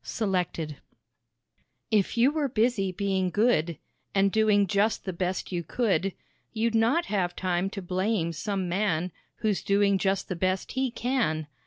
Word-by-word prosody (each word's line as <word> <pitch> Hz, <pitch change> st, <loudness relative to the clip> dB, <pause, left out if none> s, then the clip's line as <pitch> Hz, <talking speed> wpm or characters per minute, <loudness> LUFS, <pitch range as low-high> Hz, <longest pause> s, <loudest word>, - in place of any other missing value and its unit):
Selected. 180 Hz, -7 st, -2 dB, 1.1 s
"If 215 Hz, +1 st, +2 dB
you 250 Hz, +4 st, +5 dB
were 300 Hz, -2 st, 0 dB
busy 220 Hz, -4 st, +1 dB
being 190 Hz, -1 st, 0 dB
good, 175 Hz, -, +2 dB, 0.4 s
And 195 Hz, 0 st, +4 dB
doing 210 Hz, -1 st, +4 dB
just 205 Hz, +3 st, +1 dB
the 190 Hz, -, -3 dB
best 180 Hz, +2 st, -2 dB
you 175 Hz, -1 st, -1 dB
could, 195 Hz, -2 st, 0 dB, 0.4 s
You'd 230 Hz, +1 st, 0 dB
not 235 Hz, +10 st, +3 dB
have 180 Hz, -4 st, -1 dB
time 185 Hz, 0 st, 0 dB
to 195 Hz, -1 st, -6 dB
blame 185 Hz, -1 st, 0 dB
some 190 Hz, +3 st, -2 dB
man 180 Hz, -2 st, 0 dB, 0.3 s
Who's 215 Hz, -3 st, +1 dB
doing 200 Hz, -1 st, +2 dB
just 195 Hz, 0 st, 0 dB
the 185 Hz, -, -3 dB
best 185 Hz, +2 st, -1 dB
he 265 Hz, 0 st, 0 dB
can. 235 Hz, -, -1 dB
195 Hz, 150 wpm, -27 LUFS, 180-220 Hz, 1.1 s, you